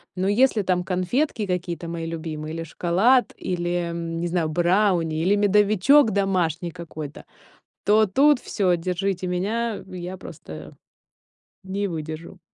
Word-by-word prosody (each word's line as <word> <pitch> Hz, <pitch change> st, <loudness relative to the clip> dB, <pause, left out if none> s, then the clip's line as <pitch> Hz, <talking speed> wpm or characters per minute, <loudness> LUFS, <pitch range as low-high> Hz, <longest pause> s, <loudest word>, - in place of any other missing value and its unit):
Но 185 Hz, +1 st, -1 dB
если 220 Hz, +1 st, +3 dB
там 180 Hz, -1 st, +1 dB
конфетки 205 Hz, -, -1 dB
какие-то 180 Hz, -2 st, -3 dB
мои 165 Hz, -1 st, -4 dB
любимые, 160 Hz, -1 st, -5 dB
или 165 Hz, -, -4 dB
шоколад, 190 Hz, -, +2 dB
или, 175 Hz, -1 st, -2 dB
м, 165 Hz, 0 st, -4 dB
не 175 Hz, -, -1 dB
знаю, 170 Hz, -2 st, 0 dB
брауни, 175 Hz, -1 st, +2 dB
или 190 Hz, +5 st, +3 dB
медовичок 210 Hz, +6 st, +4 dB
домашний 180 Hz, -4 st, 0 dB
какой-то, 155 Hz, -3 st, -8 dB, 0.6 s
то 215 Hz, +1 st, +5 dB
тут 275 Hz, +8 st, +4 dB
всё, 185 Hz, -4 st, +1 dB
держите 185 Hz, +2 st, -2 dB
меня, 210 Hz, +5 st, -2 dB
я 180 Hz, 0 st, -6 dB
просто 80 Hz, -, -10 dB, 0.9 s
не 200 Hz, +2 st, -2 dB
выдержу. 160 Hz, +1 st, -6 dB
180 Hz, 130 wpm, -24 LUFS, 170-200 Hz, 0.9 s, то